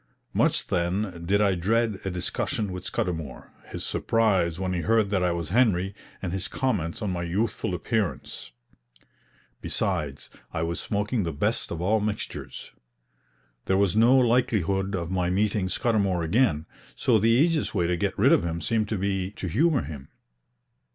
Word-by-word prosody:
Much, -, -, +2 dB
then, 90 Hz, +1 st, -1 dB
did 100 Hz, +2 st, +3 dB
I 100 Hz, -2 st, +3 dB
dread 105 Hz, +3 st, +1 dB
a 95 Hz, -, -2 dB
discussion 95 Hz, +3 st, -2 dB
with 90 Hz, 0 st, -6 dB
Scudamour, 80 Hz, -7 st, -4 dB, 0.2 s
his -, -, -6 dB
surprise 95 Hz, -7 st, +1 dB
when 95 Hz, -1 st, -1 dB
he 90 Hz, -, -1 dB
heard 110 Hz, +2 st, +2 dB
that 95 Hz, -2 st, +1 dB
I 90 Hz, -1 st, +2 dB
was 85 Hz, -2 st, -3 dB
Henry, 100 Hz, -4 st, +2 dB, 0.3 s
and 90 Hz, -2 st, -2 dB
his 95 Hz, -1 st, -2 dB
comments 105 Hz, -, -2 dB
on 100 Hz, -, -1 dB
my 90 Hz, -1 st, -2 dB
youthful 90 Hz, +1 st, -1 dB
appearance. 90 Hz, -, -3 dB, 1.1 s
Besides, 70 Hz, -2 st, -2 dB, 0.2 s
I 80 Hz, -, -2 dB
was 85 Hz, +1 st, -2 dB
smoking 105 Hz, +3 st, -1 dB
the 85 Hz, -3 st, -2 dB
best 70 Hz, -, -1 dB
of 85 Hz, -, -4 dB
all 105 Hz, +5 st, +2 dB
mixtures. 105 Hz, 0 st, -5 dB, 0.9 s
There 95 Hz, -, +2 dB
was 100 Hz, -2 st, +2 dB
no 120 Hz, +4 st, +6 dB
likelihood 105 Hz, -6 st, +2 dB
of 85 Hz, -1 st, -3 dB
my 90 Hz, -2 st, 0 dB
meeting 100 Hz, +1 st, +1 dB
Scudamour 100 Hz, -4 st, +1 dB
again, 80 Hz, -, +2 dB, 0.3 s
so 115 Hz, -4 st, +3 dB
the 110 Hz, +3 st, +3 dB
easiest 150 Hz, +5 st, +2 dB
way 90 Hz, -3 st, +2 dB
to 90 Hz, +1 st, +1 dB
get 85 Hz, -, -2 dB
rid -, -, +5 dB
of -, -, +4 dB
him 85 Hz, -1 st, -2 dB
seemed 110 Hz, +5 st, 0 dB
to 110 Hz, -, -1 dB
be 95 Hz, -1 st, -1 dB
to 100 Hz, -, -6 dB
humor 140 Hz, -, +2 dB
him. 70 Hz, -1 st, -8 dB
95 Hz, 165 wpm, -26 LUFS, 85-110 Hz, 1.1 s, no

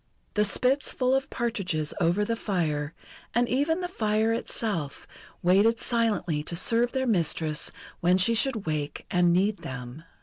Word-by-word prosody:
The 210 Hz, -, +2 dB
spits 255 Hz, +7 st, +1 dB
full 255 Hz, 0 st, +1 dB
of 270 Hz, 0 st, 0 dB
partridges 190 Hz, -11 st, -1 dB
over 175 Hz, +5 st, +2 dB
the 230 Hz, -, -1 dB
fire, 160 Hz, -8 st, -2 dB, 0.4 s
and 240 Hz, +1 st, +3 dB
even 290 Hz, +8 st, +1 dB
the 355 Hz, -, -2 dB
fire 220 Hz, -7 st, 0 dB
itself, 200 Hz, -10 st, -3 dB, 0.4 s
waited 200 Hz, +6 st, +4 dB
silently 215 Hz, -10 st, 0 dB
to 165 Hz, +3 st, -5 dB
serve 235 Hz, +6 st, +3 dB
their 260 Hz, -1 st, -1 dB
mistress 165 Hz, -7 st, 0 dB, 0.3 s
when 180 Hz, +1 st, +3 dB
she 190 Hz, +5 st, +3 dB
should 230 Hz, -2 st, +1 dB
wake 150 Hz, -2 st, -3 dB
and 175 Hz, -1 st, +3 dB
need 195 Hz, +4 st, +2 dB
them. 125 Hz, +3 st, -8 dB
205 Hz, 155 wpm, -27 LUFS, 165-235 Hz, 0.4 s, waited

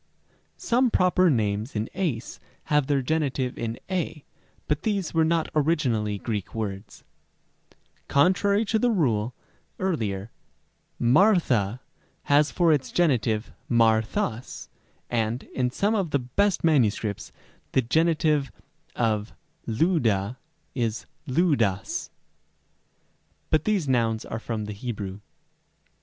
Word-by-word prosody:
Some 250 Hz, +1 st, +2 dB
proper 185 Hz, -3 st, +3 dB
names 110 Hz, -2 st, 0 dB
in 110 Hz, +2 st, -1 dB
ys 160 Hz, -12 st, -3 dB, 0.3 s
have 150 Hz, -2 st, +3 dB
their 140 Hz, -2 st, +1 dB
genitive 135 Hz, -3 st, -1 dB
in 115 Hz, 0 st, -4 dB
y, 165 Hz, -5 st, -3 dB, 0.4 s
but 150 Hz, -1 st, 0 dB
these 200 Hz, -6 st, -1 dB
were 165 Hz, -1 st, +3 dB
not 165 Hz, 0 st, +1 dB
originally 130 Hz, -10 st, +1 dB
Greek 105 Hz, -1 st, -4 dB
words, 100 Hz, -2 st, -5 dB
Rem. -, -, -42 dB, 0.6 s
d. -, -, -28 dB, 0.3 s
Contrary 200 Hz, +8 st, +3 dB
to 220 Hz, +1 st, +1 dB
the 245 Hz, -, +2 dB
rule 125 Hz, -, +1 dB, 0.4 s
(Rem. 185 Hz, -4 st, 0 dB
b) 100 Hz, -3 st, -1 dB, 0.8 s
Μάρθα 125 Hz, -, +3 dB, 0.4 s
has 145 Hz, +1 st, +4 dB
for 170 Hz, -3 st, +3 dB
its 130 Hz, -4 st, -1 dB
genitive 120 Hz, -9 st, +1 dB, 0.2 s
Μάρθας, 110 Hz, 0 st, +1 dB, 0.4 s
and, 115 Hz, +1 st, -1 dB
in 125 Hz, -1 st, 0 dB
some 200 Hz, -, 0 dB
of 195 Hz, -6 st, 0 dB
the 145 Hz, -, +2 dB
best 185 Hz, +11 st, 0 dB
MSS., 115 Hz, -9 st, +1 dB, 0.4 s
the 130 Hz, -, +3 dB
genitive 155 Hz, +1 st, +2 dB, 0.4 s
of 110 Hz, -2 st, 0 dB, 0.3 s
Λύδδα 115 Hz, -, +1 dB, 0.4 s
is 115 Hz, -4 st, -2 dB, 0.2 s
Λύδδας; 130 Hz, -, +1 dB, 1.4 s
but 155 Hz, -1 st, +2 dB
these 205 Hz, -8 st, +1 dB
nouns 115 Hz, -4 st, +1 dB
are 110 Hz, -, -5 dB
from 110 Hz, -2 st, -4 dB
the 105 Hz, -, -5 dB
Hebrew. 100 Hz, -3 st, -5 dB
130 Hz, 120 wpm, -25 LUFS, 110-165 Hz, 1.4 s, has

